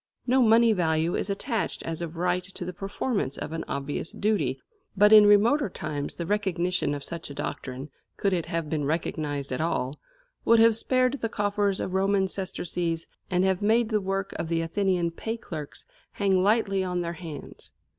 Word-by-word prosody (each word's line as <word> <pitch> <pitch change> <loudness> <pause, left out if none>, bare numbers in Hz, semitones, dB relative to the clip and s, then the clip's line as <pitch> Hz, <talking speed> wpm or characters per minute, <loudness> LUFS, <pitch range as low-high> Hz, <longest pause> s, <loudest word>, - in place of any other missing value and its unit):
No 260 +1 +3
money 230 0 +5
value 165 -2 +1
is - - -2
attached 220 +3 -2
as 165 0 -4
of 165 -1 -5
right 180 +1 0
to 185 -1 -7
the 180 - -5
performance 195 - -2
of - - -5
an 165 0 -3
obvious 140 +3 -3
duty, 170 -12 0 0.4
but 210 +2 +6
in 210 -1 +9
remoter 220 +6 +4
times 150 -4 -4
the 170 - -4
recognition 180 -5 0
of 140 - -6
such 170 0 -6
a 140 - -8
doctrine, 130 +2 -5 0.3
could 200 -1 +1
it 170 -3 -1
have 165 -2 -2
been 150 -1 -1
recognised 145 -2 -2
at 125 - -2
all, 150 -4 -1 0.4
would 230 - +5
have 225 0 +6
spared 255 +3 +1
the 225 - -1
coffers 205 -2 0
of 185 - -3
Roman 195 0 +2
sesterces 175 -3 -2 0.2
and 180 0 +2
have 190 0 +1
made 220 +2 +3
the 215 -2 +1
work 195 0 -2
of - - -3
the 165 0 0
Athenian 175 0 0
pay 225 +7 -4
clerks 155 -9 -7 0.3
hang 195 -2 +2
lightly 195 -1 +2
on 180 -1 -1
their 170 0 -3
hands. 165 -3 -9
185 Hz, 185 wpm, -27 LUFS, 165-205 Hz, 0.4 s, in